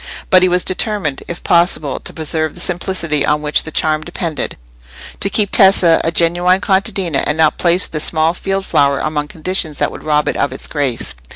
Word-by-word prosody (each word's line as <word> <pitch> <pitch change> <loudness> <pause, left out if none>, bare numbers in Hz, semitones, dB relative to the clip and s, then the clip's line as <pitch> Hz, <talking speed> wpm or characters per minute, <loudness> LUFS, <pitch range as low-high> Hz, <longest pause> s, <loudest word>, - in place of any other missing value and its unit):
But 185 - +6
he 185 - +3
was 180 0 +2
determined, 185 -6 -1
if 175 - -7
possible, 170 -5 +1
to - - -2
preserve 155 0 -3
the - - -8
simplicity 170 -3 -1
on 150 0 0
which 150 0 +2
the 160 - -6
charm 155 -1 0
depended; 165 -1 -4 0.6
to 195 - +1
keep 205 0 +1
Tessa 190 -4 +5
a 165 - 0
genuine 175 +2 +2
contadina, 190 -6 0
and 150 - -1
not 160 -1 +2
place 175 +2 +2
the 155 - -5
small 160 +1 0
field 195 +1 -3
flower 140 -1 +2
among 150 -1 -2
conditions 160 -1 -3
that - - 0
would - - -10
rob 150 -1 +1
it - - -1
of 140 - 0
its 130 - -7
grace. 140 -6 -2
165 Hz, 195 wpm, -16 LUFS, 150-185 Hz, 0.6 s, But